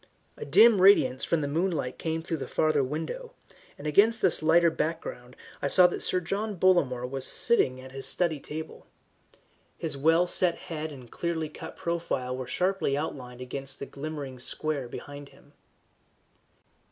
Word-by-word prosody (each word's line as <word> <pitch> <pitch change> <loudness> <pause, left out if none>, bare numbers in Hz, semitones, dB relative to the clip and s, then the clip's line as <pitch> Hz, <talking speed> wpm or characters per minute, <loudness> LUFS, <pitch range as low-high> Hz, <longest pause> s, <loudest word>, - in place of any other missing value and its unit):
A - - -7
dim 225 -4 +6
radiance 135 -10 +5
from 165 - 0
the 145 - -2
moonlight 155 -4 -2
came 160 0 -3
through 165 -1 -3
the 135 - -6
farther 155 -3 +1
window, 165 - -5 0.4
and 145 - -11
against 210 +9 +4
this 185 -4 +3
lighter 165 +1 +4
background 150 -6 -4 0.3
I - - 0
saw 180 +5 +6
that 180 - +1
Sir 185 - +1
John 200 +5 -3
Bollamore 160 -10 +2
was 135 0 -5
sitting 130 - +2
at 130 0 -11
his 135 0 -3
study 170 -4 +2
table. 155 +3 -8 0.9
His 155 -3 -4
well 165 +5 +3
set 180 -1 +3
head 160 -3 -6
and 125 -5 -12
clearly 165 -2 -3
cut - - -10
profile 165 -7 -2
were 130 -1 -6
sharply 185 -6 0
outlined 125 -5 -6
against 135 +2 -6
the - - -6
glimmering 140 -3 -7
square 140 +1 -2
behind 145 +2 -9
him. - - -22
155 Hz, 160 wpm, -27 LUFS, 135-175 Hz, 0.9 s, dim